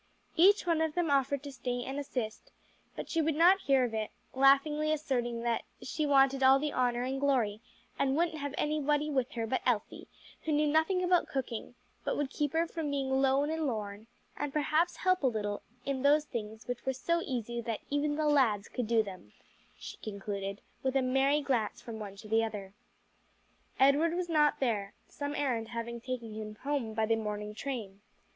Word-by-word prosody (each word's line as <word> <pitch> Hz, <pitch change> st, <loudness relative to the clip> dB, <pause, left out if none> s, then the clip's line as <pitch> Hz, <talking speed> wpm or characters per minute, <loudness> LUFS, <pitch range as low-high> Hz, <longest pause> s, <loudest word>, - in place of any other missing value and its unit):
Each 390 Hz, +4 st, +5 dB
one 335 Hz, -2 st, +2 dB
of 320 Hz, -1 st, 0 dB
them 345 Hz, -4 st, +1 dB
offered 275 Hz, 0 st, +2 dB
to 285 Hz, -, -6 dB
stay 245 Hz, -2 st, -3 dB
and 270 Hz, +3 st, -4 dB
assist, 245 Hz, -6 st, -4 dB, 0.4 s
but -, -, -5 dB
she 330 Hz, -, +1 dB
would 315 Hz, -1 st, +1 dB
not 355 Hz, +5 st, +6 dB
hear 270 Hz, -5 st, +3 dB
of 240 Hz, -2 st, -1 dB
it; 220 Hz, -1 st, -2 dB, 0.2 s
laughingly 280 Hz, +3 st, +4 dB
asserting 245 Hz, -6 st, -1 dB
that 235 Hz, -1 st, +1 dB, 0.2 s
"she 305 Hz, -2 st, -2 dB
wanted 270 Hz, -1 st, +4 dB
all 265 Hz, +1 st, +7 dB
the 295 Hz, +1 st, -2 dB
honor 245 Hz, -1 st, +1 dB
and 265 Hz, +1 st, -2 dB
glory, 240 Hz, -7 st, +1 dB, 0.4 s
and 275 Hz, +1 st, +2 dB
wouldn't 330 Hz, -2 st, 0 dB
have 285 Hz, -1 st, -4 dB
anybody 300 Hz, 0 st, +1 dB
with 265 Hz, 0 st, 0 dB
her 230 Hz, -2 st, -2 dB
but 255 Hz, +4 st, -1 dB
Elsie, 235 Hz, -5 st, -1 dB, 0.4 s
who 315 Hz, -, 0 dB
knew 300 Hz, +1 st, +3 dB
nothing 320 Hz, +5 st, +2 dB
about 360 Hz, -1 st, +3 dB
cooking, 245 Hz, -3 st, -4 dB, 0.3 s
but -, -, -1 dB
would 285 Hz, -2 st, -1 dB
keep 295 Hz, -1 st, -1 dB
her 330 Hz, +1 st, +2 dB
from 325 Hz, -2 st, -4 dB
being 275 Hz, -2 st, -1 dB
'lone 275 Hz, +2 st, +3 dB
and 320 Hz, -1 st, -1 dB
lorn,' 210 Hz, -2 st, -4 dB, 0.3 s
and 290 Hz, -1 st, -3 dB
perhaps 310 Hz, +4 st, +1 dB
help 370 Hz, -1 st, +2 dB
a 270 Hz, -, +3 dB
little 205 Hz, -3 st, -2 dB, 0.2 s
in 275 Hz, -2 st, -1 dB
those 295 Hz, +2 st, +4 dB
things 220 Hz, -3 st, -6 dB
which 245 Hz, -1 st, -4 dB
were 265 Hz, -, 0 dB
so 335 Hz, +6 st, 0 dB
easy 235 Hz, -2 st, -3 dB
that 225 Hz, -1 st, -3 dB
even 290 Hz, +1 st, +1 dB
the 310 Hz, 0 st, 0 dB
lads 250 Hz, -9 st, +3 dB
could 245 Hz, -3 st, -3 dB
do 225 Hz, -1 st, +3 dB
them," 185 Hz, -, -10 dB, 0.4 s
she -, -, -9 dB
concluded, 200 Hz, -1 st, -5 dB, 0.2 s
with 265 Hz, 0 st, -1 dB
a 270 Hz, -, +3 dB
merry 270 Hz, +3 st, +3 dB
glance 250 Hz, -7 st, 0 dB
from 225 Hz, -2 st, -8 dB
one 200 Hz, -2 st, -7 dB
to 205 Hz, +2 st, -11 dB
the 225 Hz, +1 st, +3 dB
other. 200 Hz, -3 st, -5 dB, 1.1 s
Edward 290 Hz, +5 st, +4 dB
was 355 Hz, -1 st, -2 dB
not 300 Hz, -2 st, +3 dB
there, 210 Hz, -6 st, -1 dB
some 285 Hz, 0 st, -5 dB
errand 245 Hz, -6 st, -1 dB
having 235 Hz, 0 st, -5 dB
taken 240 Hz, -3 st, -5 dB
him 215 Hz, 0 st, -6 dB
home 270 Hz, -6 st, -1 dB
by 220 Hz, 0 st, +2 dB
the 225 Hz, +1 st, +2 dB
morning 210 Hz, -1 st, -4 dB
train. 215 Hz, -5 st, -5 dB
265 Hz, 195 wpm, -31 LUFS, 225-295 Hz, 1.1 s, all